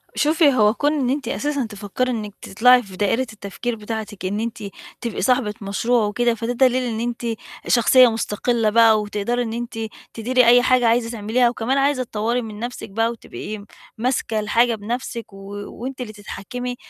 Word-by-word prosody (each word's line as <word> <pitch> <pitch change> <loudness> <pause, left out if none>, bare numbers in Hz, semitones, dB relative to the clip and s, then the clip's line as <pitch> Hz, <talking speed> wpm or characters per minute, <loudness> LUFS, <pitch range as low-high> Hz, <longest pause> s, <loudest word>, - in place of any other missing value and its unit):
شوفي، 300 -1 +4
هو 210 -3 +4
كُون 290 +4 +1
إن 270 -5 0
أنتِ 280 +1 -1
أساسًا 285 -3 -1
تفكّري 215 +4 -3
إنِّك 215 -4 -4
تطلّعي 250 +5 +4
في 190 -3 -12
دائرة 205 +5 +1
التفكير 220 +3 -4
بتاعتِك، 215 -2 -6
إن 205 +3 -1
أنتِ 225 -1 -4 0.4
تبقي 235 -3 -3
صاحبة 250 -5 +2
مشروع 215 +4 +1
وكده، 235 +3 +1
فده 230 +2 -3
دليل 255 0 +3
إن 230 -3 -3
أنتِ 240 0 -3 0.4
شخصية 250 +1 +6
مُستقلّة 225 +1 0
بقى، 220 -1 +5
وتقدري 210 +4 -2
إن 225 -1 -4
أنتِ 235 -1 -5 0.3
تديري 250 +2 +2
أي 245 +1 +7
حاجة 250 -2 +4
عايزة 230 0 +2
تعمليها، 235 +2 +1
وكمان 240 +3 -1
عايزة 275 -1 +2
تطوّري 230 +1 -1
من 215 -2 -8
نَفسِك 240 -2 -6
بقى 225 +3 +1
وتبقي 215 -2 -8 0.3
ماسكة 235 -2 0
الحاجة 230 +3 +2
بنَفسِك 230 0 -5
و 195 - -11 0.4
وأنتِ 260 0 -5
اللي 215 -3 -6
تتحكّمي 245 +4 -6
235 Hz, 170 wpm, -21 LUFS, 215-250 Hz, 0.4 s, أي